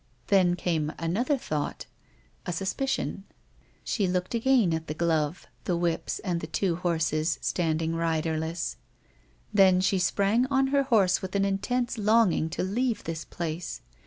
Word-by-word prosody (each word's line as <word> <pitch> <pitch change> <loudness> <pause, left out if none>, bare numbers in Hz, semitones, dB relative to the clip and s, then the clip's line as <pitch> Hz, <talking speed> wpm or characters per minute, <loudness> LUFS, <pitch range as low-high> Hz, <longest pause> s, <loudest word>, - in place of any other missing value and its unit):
Then 185 -4 +4
came 160 -4 -1
another 225 - 0
thought 150 - -3 0.3
— - - -35
a - - 0
suspicion. 195 +4 -2 0.6
She 200 -4 0
looked 180 +2 -1
again 235 -6 +3
at 160 0 -3
the 150 - -4
glove, 160 -1 0 0.2
the 175 - 0
whips 170 -1 -1
and 175 -4 -2
the - - -5
two 180 -4 0
horses 160 -2 0
standing 165 -1 0
riderless; 160 0 -1 0.8
then 190 -3 +6
she 190 +1 +2
sprang 200 +6 +2
on 270 0 +2
her 280 0 +3
horse 215 -9 +3
with 190 +1 -6
an 200 0 +2
intense 235 +5 -1
longing 210 -6 +3
to - - -3
leave 230 +5 -1
this 160 -1 -4
place. 170 0 -5
180 Hz, 150 wpm, -27 LUFS, 165-210 Hz, 0.8 s, then